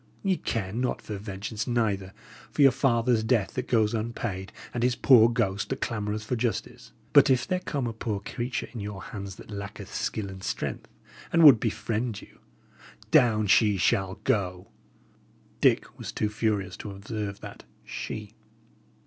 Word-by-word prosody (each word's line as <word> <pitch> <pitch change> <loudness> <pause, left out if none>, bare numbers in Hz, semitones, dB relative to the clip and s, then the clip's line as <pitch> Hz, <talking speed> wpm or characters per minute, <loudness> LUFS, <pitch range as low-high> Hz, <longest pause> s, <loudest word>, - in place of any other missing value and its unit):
Ye 190 -2 +2
care 95 -4 -3
not 125 +2 -1
for 105 - -6
vengeance, 105 +2 -5
neither 105 -6 0 0.4
for 145 - +2
your 135 - +8
father's 120 -3 +2
death 110 -3 +1
that 125 0 -3
goes 110 -2 +2
unpaid, 110 -4 -3 0.2
and 120 - -2
his 125 0 +2
poor 120 -4 +6
ghost 105 -5 -1
that 135 - -2
clamoureth 105 -2 -2
for 125 - -1
justice. 120 0 -3 0.2
But 145 0 +7
if 130 -2 +3
there 185 -1 0
come 140 -6 -3
but 120 - -1
a - - -10
poor 110 -2 -3
creature 120 +5 -4
in 120 - -6
your 100 -1 -6
hands 100 -4 -7
that - - -13
lacketh 100 0 -7
skill 105 -3 -2
and 95 -1 -9
strength, - - -3 0.4
and 165 0 +4
would 140 -7 +10
befriend 115 0 -2
you, - - -16 0.7
down 110 -3 +5
she 105 0 +4
shall 95 +1 +1
go!" 90 -3 -1 0.9
Dick - - +2
was - - -5
too 105 - -1
furious 105 -3 -1
to 105 - -7
observe 100 0 -5
that - - -10 0.2
"she." 105 -1 -6
110 Hz, 165 wpm, -27 LUFS, 100-120 Hz, 0.9 s, would